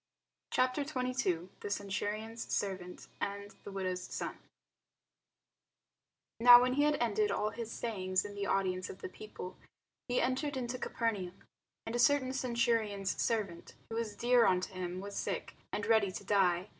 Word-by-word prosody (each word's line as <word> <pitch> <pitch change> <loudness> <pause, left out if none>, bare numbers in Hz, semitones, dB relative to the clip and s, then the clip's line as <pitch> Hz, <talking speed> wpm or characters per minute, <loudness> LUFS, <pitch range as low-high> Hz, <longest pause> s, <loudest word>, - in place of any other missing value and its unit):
CHAPTER 255 +3 +2
22 250 - -1
THE - - -5
CENTURION'S 205 +3 -3
SERVANT 185 -3 -3 0.2
AND 200 0 -3
THE - - -7
WIDOW'S 185 -2 -3
SON - - -3 2.0
NOW 245 +1 +11
when 250 +1 +2
he 290 +2 +3
had 300 0 +3
ended 215 -5 +1
all 210 +1 0
his 230 -1 -6
sayings 185 -6 -1
in 205 - -6
the 200 0 -3
audience 185 -1 0
of 185 - -9
the - - -5
people, 185 -2 -8 0.5
he 245 - +2
entered 265 +3 0
into 250 0 -3
Capernaum. 205 -9 -1 0.5
And 225 - -3
a - - 0
certain 260 0 +4
centurion's 230 -6 +1
servant, 200 -7 -1 0.2
who - - -2
was 225 -2 -2
dear 240 0 +4
unto 185 +1 +1
him, 185 0 -4
was 200 +1 -7
sick, - - -3 0.2
and 205 - -2
ready 220 -3 +4
to - - -6
die. 190 -2 +2
210 Hz, 155 wpm, -33 LUFS, 190-240 Hz, 2.0 s, NOW